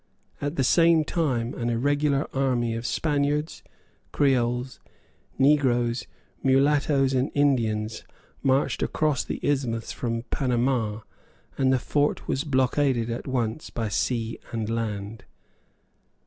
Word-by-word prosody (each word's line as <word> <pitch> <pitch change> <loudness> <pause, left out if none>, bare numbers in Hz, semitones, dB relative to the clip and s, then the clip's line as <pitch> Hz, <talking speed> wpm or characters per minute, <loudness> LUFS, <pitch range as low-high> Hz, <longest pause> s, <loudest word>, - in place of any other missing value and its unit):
At 145 +2 -2
the 135 - +1
same 165 +3 +4
time 130 -8 -1
an 120 -1 -2
irregular 140 +4 +1
army 125 -4 0
of 115 +1 -3
Spaniards, 150 0 -1 0.5
Creoles, 125 -2 +1 0.6
negroes, 125 -4 +2 0.3
mulattoes 135 0 +3
and 130 +1 +1
Indians 115 -6 +1 0.4
marched 135 0 +1
across 150 -4 0
the - - -5
isthmus 125 -6 -1
from 115 -1 -3
Panama; 120 -4 0 0.5
and 130 -1 +2
the 130 - +4
fort 145 +4 0
was 135 - 0
blockaded 130 -3 +1
at 115 - -5
once 125 +1 -2
by 115 -2 -3
sea 115 +1 -1
and 115 -1 -3
land. 110 -2 -4
130 Hz, 115 wpm, -25 LUFS, 115-145 Hz, 0.6 s, same